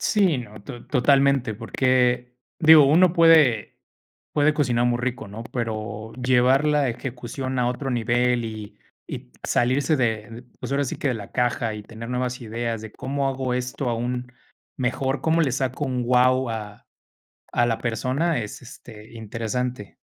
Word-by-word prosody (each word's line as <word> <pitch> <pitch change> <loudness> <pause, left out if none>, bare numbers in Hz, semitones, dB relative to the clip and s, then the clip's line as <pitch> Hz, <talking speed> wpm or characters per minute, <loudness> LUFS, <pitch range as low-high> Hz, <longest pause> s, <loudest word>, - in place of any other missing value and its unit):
Sí, 190 -9 +2
no, 110 -4 -9
to 120 -1 -9
totalmente, 135 -3 +2
porque, 125 +1 +1 0.2
digo, 160 -2 +8
uno 165 +5 +5
puede 160 - +5 0.6
puede 150 +1 +3
cocinar 120 -5 +1
muy 120 0 +1
rico, 125 -3 -3
¿no? 105 +3 -8
Pero 110 -2 -4
llevar 130 +2 +3
la 150 -2 +2
ejecución 130 +2 -5
a 120 - +2
otro 125 +3 -3
nivel, 120 0 +1
y 110 -2 -8 0.3
y 60 - -7
salirse 135 +6 +1
de, 115 -2 -2 0.2
pues, - - -6
ahora 140 +1 +1
sí 130 - -4
que - - -1
de 130 - +1
la 105 -4 -8
caja 120 -2 0
y 105 - -7
tener 115 +2 -9
nuevas 125 0 -2
ideas 115 0 -3
de: 110 - -9
¿Cómo 140 +1 -2
hago 130 -2 -2
esto 125 +1 -3
aún 125 +1 -3 0.4
mejor?, 130 +2 -1
¿cómo 165 +1 +2
le 145 -5 +1
saco 130 +2 -2
un 125 -2 -2
guau 125 +1 +3
a 105 -2 -7 0.7
a 120 - +2
la 115 -1 0
persona? 130 +8 -1
Es, 105 +4 -8
este, 115 -3 -13
interesante. 115 +1 -4
125 Hz, 160 wpm, -24 LUFS, 115-135 Hz, 0.7 s, digo